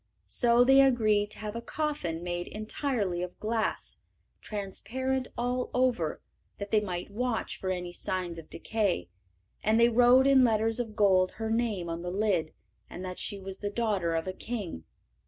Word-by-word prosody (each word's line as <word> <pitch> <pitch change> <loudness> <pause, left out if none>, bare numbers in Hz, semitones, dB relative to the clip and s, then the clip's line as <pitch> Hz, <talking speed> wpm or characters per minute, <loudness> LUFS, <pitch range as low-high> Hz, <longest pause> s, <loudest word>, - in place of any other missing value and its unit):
So 240 0 +4
they 270 +2 +7
agreed 215 -6 +3
to - - -10
have 210 0 -5
a 235 - -3
coffin 235 - -3
made 175 0 -3
entirely 215 -4 -2
of 180 0 -6
glass, 220 0 -2 0.4
transparent 250 +6 -3
all 245 +1 -1
over, 245 -11 +1 0.3
that 200 0 -6
they 215 - +5
might 185 -2 -4
watch 240 +1 -2
for 190 - -3
any 180 -1 -3
signs 180 -2 -3
of 160 - -13
decay, 200 - -1 0.5
and 220 +2 +3
they 235 0 +6
wrote 245 +2 +6
in 275 -1 +6
letters 225 0 +2
of 225 -3 -4
gold 190 -3 +4
her 220 0 -3
name 225 -6 0
on 165 0 -4
the 175 - -4
lid, 185 -4 0 0.4
and 185 - -7
that 180 0 -6
she 205 - -2
was 190 0 -7
the 205 - -2
daughter 200 -7 0
of 165 - -1
a 185 - -3
king. 190 - -5
210 Hz, 175 wpm, -29 LUFS, 185-240 Hz, 0.5 s, they